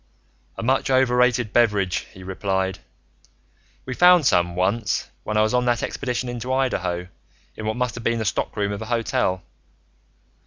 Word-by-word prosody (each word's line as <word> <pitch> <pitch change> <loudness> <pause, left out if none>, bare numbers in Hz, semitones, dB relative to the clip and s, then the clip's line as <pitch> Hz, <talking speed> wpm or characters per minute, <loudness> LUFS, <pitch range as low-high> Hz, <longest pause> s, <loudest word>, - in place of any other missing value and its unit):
"A - - -4
much 130 +3 +1
overrated 125 -3 +2
beverage," 105 -6 +2
he 95 - -12
replied. 95 0 -2 1.1
"We 130 - -4
found 180 +2 +6
some, 85 -6 +2
once, 100 +4 0 0.2
when 105 - -2
I 105 - +5
was 110 - 0
on 125 0 +2
that 120 -1 +1
expedition 125 -1 -3
into 120 +1 -4
Idaho, 90 -10 -1 0.5
in 110 - -5
what 110 - -2
must 125 -3 -1
have 115 - -8
been 115 0 +1
the 110 - -2
stockroom 100 0 -1
of 100 +1 -5
a - - -4
hotel. 110 -5 0
115 Hz, 160 wpm, -23 LUFS, 95-125 Hz, 1.1 s, found